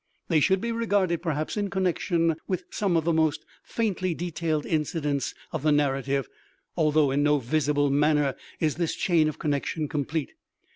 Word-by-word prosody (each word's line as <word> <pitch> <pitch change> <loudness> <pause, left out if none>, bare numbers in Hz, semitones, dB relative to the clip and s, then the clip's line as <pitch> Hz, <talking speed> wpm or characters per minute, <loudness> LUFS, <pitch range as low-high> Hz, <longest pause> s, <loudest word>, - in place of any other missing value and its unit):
They 160 -3 +4
should 190 +5 +3
be 235 - -2
regarded, 200 -7 +1
perhaps, 155 -3 -2
in 205 -1 -1
connection 175 -3 +1
with 185 -2 -2
some 190 -5 +1
of 160 - +1
the 170 - +2
most 160 -1 +1 0.2
faintly 185 -6 -1
detailed 165 -2 -2
incidents 150 -2 -1 0.2
of 160 - -3
the 155 +1 +2
narrative; 135 -2 +1 0.5
although 155 -2 +3
in 140 +2 +1
no 150 0 +4
visible 145 +2 +1
manner 145 -1 +3 0.3
is 155 -2 0
this 170 -2 -1
chain 165 -4 +2
of 155 - -7
connection 150 +1 -1
complete. 150 +1 -2
155 Hz, 160 wpm, -26 LUFS, 145-175 Hz, 0.5 s, They